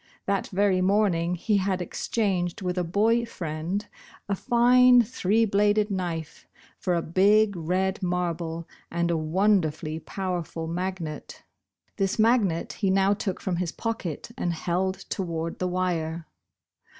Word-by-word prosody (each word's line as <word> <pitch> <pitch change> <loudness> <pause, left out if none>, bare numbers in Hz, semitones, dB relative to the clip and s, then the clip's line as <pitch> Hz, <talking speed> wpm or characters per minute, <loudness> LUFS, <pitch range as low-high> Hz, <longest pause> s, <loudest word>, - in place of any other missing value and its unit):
That 195 -1 0
very 190 -1 +2
morning 185 -3 +2
he 205 +4 +1
had 190 -1 0
exchanged 180 0 -2
with 180 -1 -1
a 180 - 0
boy 220 +7 +2
friend 180 0 -4 0.4
a 200 - 0
line 245 +1 +6
three 225 -1 +1
bladed 210 +1 +2
knife 170 -5 -4 0.3
for 180 -2 0
a 170 - 0
big 200 +4 +3
red 185 +4 -1
marble 170 -2 -2 0.2
and 170 0 0
a - - +1
wonderfully 160 -2 +1
powerful 175 -1 -4
magnet. 170 -2 -5 0.5
This 195 -2 0
magnet 215 -7 +2
he 195 - -1
now 195 +1 +3
took 195 -2 -3
from 180 -2 -2
his 175 -2 -2
pocket, 225 -5 -4
and 175 - 0
held 185 +3 -1 0.2
toward 165 -3 -3
the 185 - 0
wire. 170 -3 -2
185 Hz, 135 wpm, -26 LUFS, 170-205 Hz, 0.5 s, line